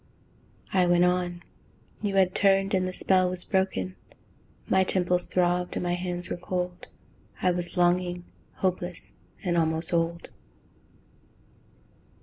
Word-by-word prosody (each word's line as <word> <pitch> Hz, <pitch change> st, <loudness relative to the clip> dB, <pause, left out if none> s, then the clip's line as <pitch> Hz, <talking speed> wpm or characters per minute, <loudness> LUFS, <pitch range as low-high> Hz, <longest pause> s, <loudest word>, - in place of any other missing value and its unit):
I 185 Hz, -2 st, +3 dB
went 175 Hz, 0 st, +4 dB
on: 180 Hz, -1 st, -1 dB, 0.6 s
you 205 Hz, -2 st, -2 dB
had 185 Hz, -1 st, +3 dB
turned 195 Hz, 0 st, +3 dB
and 185 Hz, -1 st, +1 dB
the -, -, -3 dB
spell 185 Hz, 0 st, +3 dB
was 180 Hz, -1 st, +5 dB
broken. 190 Hz, -, -1 dB, 0.7 s
My 190 Hz, 0 st, +3 dB
temples 180 Hz, -1 st, +1 dB
throbbed, 180 Hz, 0 st, 0 dB
and -, -, -2 dB
my 175 Hz, 0 st, 0 dB
hands 175 Hz, 0 st, -4 dB
were -, -, -4 dB
cold. 180 Hz, 0 st, -4 dB, 0.6 s
I 185 Hz, -, +4 dB
was 175 Hz, +1 st, -1 dB
longing, 175 Hz, 0 st, +1 dB, 0.3 s
hopeless, 180 Hz, -2 st, -2 dB, 0.3 s
and 175 Hz, -2 st, 0 dB
almost 160 Hz, +1 st, 0 dB
old. 170 Hz, 0 st, -1 dB
180 Hz, 130 wpm, -26 LUFS, 175-185 Hz, 0.7 s, was